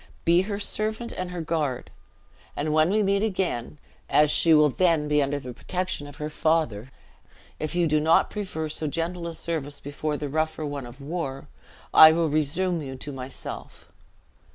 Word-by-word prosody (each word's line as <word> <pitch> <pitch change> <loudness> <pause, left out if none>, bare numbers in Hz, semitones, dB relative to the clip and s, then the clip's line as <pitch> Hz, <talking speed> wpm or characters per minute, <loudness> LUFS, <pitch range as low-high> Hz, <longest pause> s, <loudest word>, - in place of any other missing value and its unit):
Be 170 +2 +5
her 200 -1 -2
servant 215 +3 -2
and 185 0 -4
her 180 -1 -5
guard; 150 -6 -2 0.6
and 150 +1 -1
when 155 +2 +4
we 210 +2 +2
meet 200 0 +2
again, 185 - -2 0.3
as 150 0 +4
she 165 - +3
will 150 -2 +6
then 165 -2 +2
be 150 0 +3
under 145 +1 -1
the 125 -2 -8
protection 180 -1 -3
of 145 - -11
her 150 +1 -4
father, 150 -7 0 0.7
if 155 +2 -3
you 175 -1 +3
do 155 -1 +2
not 160 +2 +3
prefer 185 -7 -4
so 155 0 -2
gentle 170 +3 -3
a 165 - -6
service 155 -3 -4
before 145 +1 -3
the 145 - -4
rougher 155 +2 -1
one 140 -3 -5
of 125 +4 -13
war, 140 -3 -4 0.5
I 160 0 +10
will 165 -1 +1
resume 160 +4 0
you 135 -2 -6
to 145 +3 -6
myself." 130 -1 -8
155 Hz, 175 wpm, -25 LUFS, 145-175 Hz, 0.7 s, I